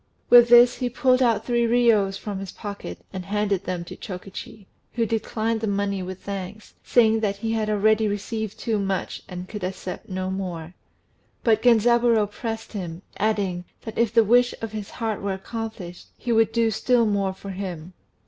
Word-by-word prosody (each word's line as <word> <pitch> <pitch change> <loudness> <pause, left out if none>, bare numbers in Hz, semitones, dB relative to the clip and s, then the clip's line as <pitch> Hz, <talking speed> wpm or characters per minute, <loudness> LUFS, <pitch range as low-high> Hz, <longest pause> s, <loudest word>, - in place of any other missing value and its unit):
With 240 -1 +9
this 240 +1 +7
he 250 - -1
pulled 255 +1 +2
out 235 -3 +2
three 235 -1 +2
riyos 225 -5 +3
from 205 -2 -5
his 195 -1 -6
pocket 205 -1 -8
and 185 -1 -4
handed 200 -1 -1
them 180 -2 -3
to 170 - -9
Chokichi. 195 +2 -8 0.3
who 230 -1 +1
declined 225 0 -1
the 220 - -1
money 200 -1 -1
with 185 0 -7
thanks, 200 +1 -6
saying 225 -2 +4
that 205 -2 0
he 225 +2 -3
had 220 -1 0
already 215 +1 +3
received 210 +1 -3
too 220 -3 -1
much, 195 -2 -2
and 180 0 -6
could 210 -2 -7
accept 185 +1 -5
no 185 0 -3
more; 175 -3 -5 0.7
but 220 -2 +3
Genzaburô 235 -2 +4
pressed 225 +1 -5
him, 180 -3 -6
adding, 200 -4 0 0.2
that 225 - -7
if 230 -2 +3
the 230 0 +5
wish 245 +3 +4
of 225 -2 -5
his 215 -2 -6
heart 225 -3 -3
were 200 0 -1
accomplished 195 -3 -7
he 240 - -3
would 225 -1 +3
do 230 -1 +2
still 235 +2 +2
more 200 -2 +1
for 195 +1 -8
him. 185 -3 -6
210 Hz, 180 wpm, -24 LUFS, 195-225 Hz, 0.7 s, With